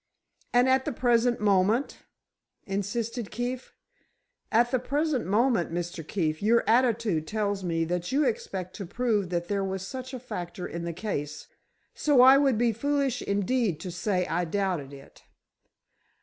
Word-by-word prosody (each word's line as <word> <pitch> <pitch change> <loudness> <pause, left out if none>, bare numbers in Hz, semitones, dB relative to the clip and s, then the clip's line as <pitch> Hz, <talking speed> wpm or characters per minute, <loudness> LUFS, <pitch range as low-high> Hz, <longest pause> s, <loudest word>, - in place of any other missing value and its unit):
"And 245 +1 +4
at 260 0 +3
the 300 - -1
present 240 -1 +2
moment?" 210 +5 +2 0.7
insisted 215 +3 -3
Keefe. 245 +3 -5 0.8
"At 240 +2 +3
the 255 - +2
present 285 - -1
moment, 210 -4 +2
Mr. 175 0 -4
Keefe, 155 -5 -1
your 230 +3 +3
attitude 225 -9 +2
tells 205 -1 -1
me 165 -2 0
that 175 +4 -3
you 285 +3 +2
expect 245 - -3
to 195 -4 -6
prove 215 -3 0
that 175 -1 -2
there 200 0 -1
was 190 -1 -3
such 260 +4 -7
a - - -6
factor 180 -7 -6
in 170 0 -5
the 170 - -2
case, 150 -6 -5 0.4
so 290 -4 +3
I 265 +2 +8
would 270 -5 +3
be 235 0 +2
foolish 275 +1 0
indeed 200 -3 0
to 180 - -5
say 180 +1 -1
I 175 +1 -1
doubted 175 -5 -2
it. 140 -1 -14
210 Hz, 155 wpm, -27 LUFS, 180-250 Hz, 0.8 s, I